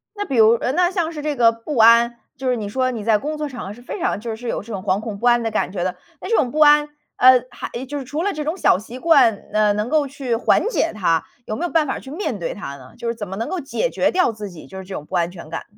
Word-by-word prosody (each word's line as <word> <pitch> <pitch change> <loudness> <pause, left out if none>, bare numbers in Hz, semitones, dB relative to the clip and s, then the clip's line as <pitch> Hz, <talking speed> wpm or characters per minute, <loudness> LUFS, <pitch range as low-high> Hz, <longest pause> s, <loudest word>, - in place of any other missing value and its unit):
那 410 0 -3
比 275 - -3
如 220 0 +7
呃， 250 - 0
那 355 +2 +2
像 340 -4 -1
是 300 - -6
这 295 -1 -2
个 235 -2 +5
不 230 +5 -6
安， 235 +1 +6 0.2
就 265 -1 -3
是 250 - +2
你 210 -3 -4
说 255 +3 0
你 225 -4 -5
在 220 -1 +3
工 305 +6 -4
作 300 - -3
场 250 -3 -7
合 200 - -6
是 240 - -14
非 305 - -7
常 370 - -1
就 225 0 -5
是 245 +2 -8
有 - - -2
这 230 - -11
种 190 - -4
惶 190 +2 +1
恐 220 -3 -5
不 240 - -5
安 240 0 +4
的 225 - -1
感 215 - -1
觉 185 -3 -3
的。 185 0 -2 0.3
那 - - -6
这 455 - +3
种 245 - +1
不 305 - -3
安， 295 0 +6 0.3
呃， 255 -1 +6
还 - - -7 0.2
就 290 - -4
是 280 - -4
除 290 +5 -4
了 405 +3 0
这 300 0 -4
种 315 +4 -2
小 - - +4
习 230 +6 -9
惯， 270 -9 +5 0.2
呃， 210 -1 +3
能 210 +3 -2
够 300 -2 +2
去 260 -4 -3
缓 245 - +2
解 400 -8 0
它， 170 -6 +1 0.2
有 215 - -4
没 345 - -2
有 350 - -4
办 315 -3 +2
法 - - -2
去 265 - -11
面 305 - -3
对 170 - -4
它 140 -9 -7
呢？ 130 -2 -15
就 235 - -6
是 230 - -1
怎 210 -3 -6
么 190 - -6
能 230 - -3
够 375 - -2
解 335 - -2
决 - - +1
掉 365 -9 +2
自 210 -2 -7
己 165 -3 -12
就 190 - -10
是 190 - -6
这 190 +1 -9
种 150 - -5
不 - - -6
安 170 0 +1
全 170 -4 -11
感， 165 - -5
240 Hz, 340 characters per minute, -21 LUFS, 210-300 Hz, 0.3 s, 如